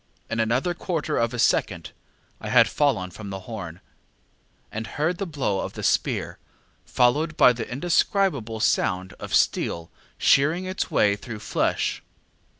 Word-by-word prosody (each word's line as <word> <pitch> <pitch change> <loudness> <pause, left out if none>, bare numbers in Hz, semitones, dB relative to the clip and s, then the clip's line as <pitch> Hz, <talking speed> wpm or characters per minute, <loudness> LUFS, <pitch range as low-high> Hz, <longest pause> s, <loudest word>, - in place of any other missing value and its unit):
In 115 - -1
another 125 +10 +1
quarter 170 -3 -3
of 115 0 +1
a 125 - -5
second 115 - +1 0.5
I - - -6
had - - +6
fallen 115 -11 0
from 100 +3 -9
the 95 -1 -6
horn, 95 -6 -8 0.9
and 110 +1 -5
heard 165 +4 -1
the 195 - -2
blow 130 - -1
of - - -4
the - - -7
spear, - - 0 0.4
followed 150 +6 +1
by 125 - +7
the 115 -1 -6
indescribable 140 - 0
sound 95 -2 +1
of - - -2
steel 85 0 0 0.3
shearing 155 +7 +3
its 185 0 -3
way 100 -1 +3
through 110 +1 -8
flesh. - - -1
120 Hz, 150 wpm, -24 LUFS, 105-155 Hz, 0.9 s, by